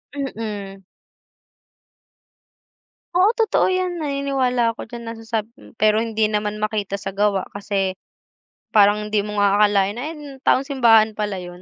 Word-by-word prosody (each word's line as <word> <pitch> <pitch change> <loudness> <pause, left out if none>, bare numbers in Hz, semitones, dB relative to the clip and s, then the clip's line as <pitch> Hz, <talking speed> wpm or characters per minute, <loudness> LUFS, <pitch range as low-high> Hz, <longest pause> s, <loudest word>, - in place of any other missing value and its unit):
Mm. 210 -8 -5 2.3
Oo, 370 +3 +5
totoo 450 - +3
yan. 365 -2 -1
Naniniwala 270 -5 0
ako - - -8
diyan 235 0 -8
nasasab 225 -1 -3
hmm, 280 - -17
pero 215 +1 +3
hindi 220 -1 0
naman 210 0 -2
makita 210 -2 -2
sa 195 0 -6
gawa 200 -2 +1
kasi 195 -2 -1 0.8
parang 210 0 +4
hindi 210 -1 +1
mo 210 0 -6
nga 205 0 +3
akalain 205 -1 +3
na - - -4
yan, 320 -2 -8 0.2
taong 270 0 +2
simbahan 230 -6 +4
pala 210 -2 -3
yun. 175 0 -9
215 Hz, 140 wpm, -21 LUFS, 205-245 Hz, 2.3 s, Oo